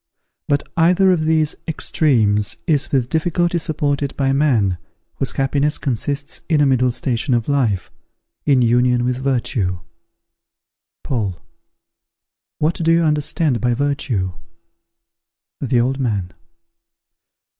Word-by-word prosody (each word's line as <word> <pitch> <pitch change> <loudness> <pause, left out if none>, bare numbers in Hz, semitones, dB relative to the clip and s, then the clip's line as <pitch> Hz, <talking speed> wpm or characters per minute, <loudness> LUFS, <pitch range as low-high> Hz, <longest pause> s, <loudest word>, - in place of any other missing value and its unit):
But 145 0 +1
either 180 +3 +4
of 160 -4 +1
these 155 -1 +2
extremes 115 -10 +1
is 150 -5 +1
with 130 -4 +1
difficulty 170 +3 0
supported 145 -3 -2
by 135 -1 +1
man, 115 - +1 0.4
whose 135 - -1
happiness 145 +2 0
consists 140 +2 -2
in 155 -3 +3
a 145 - +4
middle 130 -2 +2
station 125 +1 -1
of 115 -2 -1
life, 120 -10 0 0.5
in 135 -4 +3
union 120 +1 +2
with 125 0 0
virtue. 120 -8 0 1.3
Paul. 105 -9 -2 1.2
What 155 +3 +1
do 165 -1 0
you 165 0 +3
understand 150 - +1
by 120 -1 +1
virtue? 130 -8 -1 1.3
_The 125 -2 +1
Old 135 +2 -1
Man. 100 -8 -2
135 Hz, 115 wpm, -19 LUFS, 120-150 Hz, 1.3 s, either